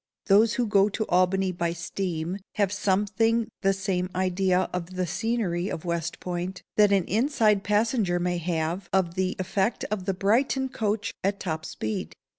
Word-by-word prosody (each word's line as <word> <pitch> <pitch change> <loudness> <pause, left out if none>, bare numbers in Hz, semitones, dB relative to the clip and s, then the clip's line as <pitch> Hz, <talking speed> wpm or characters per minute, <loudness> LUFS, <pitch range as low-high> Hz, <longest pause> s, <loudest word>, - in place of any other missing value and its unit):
Those 210 +2 +5
who 245 - +1
go 205 -1 +4
to 220 +2 -2
Albany 185 +1 +2
by 170 -1 -1
steam 170 +1 -3 0.2
have 200 -3 +1
something 210 +4 +1
the 195 - +3
same 190 -2 -1
idea 185 0 +1
of 180 0 -4
the 185 0 0
scenery 190 -1 -1
of 160 - -5
West 170 -1 -2
Point, 180 +1 -4
that 210 -1 +5
an 195 -2 +4
inside 215 - +2
passenger 210 -3 +1
may 175 0 0
have 170 +2 -2
of 185 -3 +1
the 185 +1 -1
effect 190 +4 -1
of 200 -4 -2
the 195 -1 0
Brighton 260 +7 +1
coach 215 -3 -2
at 200 +1 0
top 160 -4 -3
speed. 110 0 -4
190 Hz, 165 wpm, -26 LUFS, 180-210 Hz, 0.2 s, Those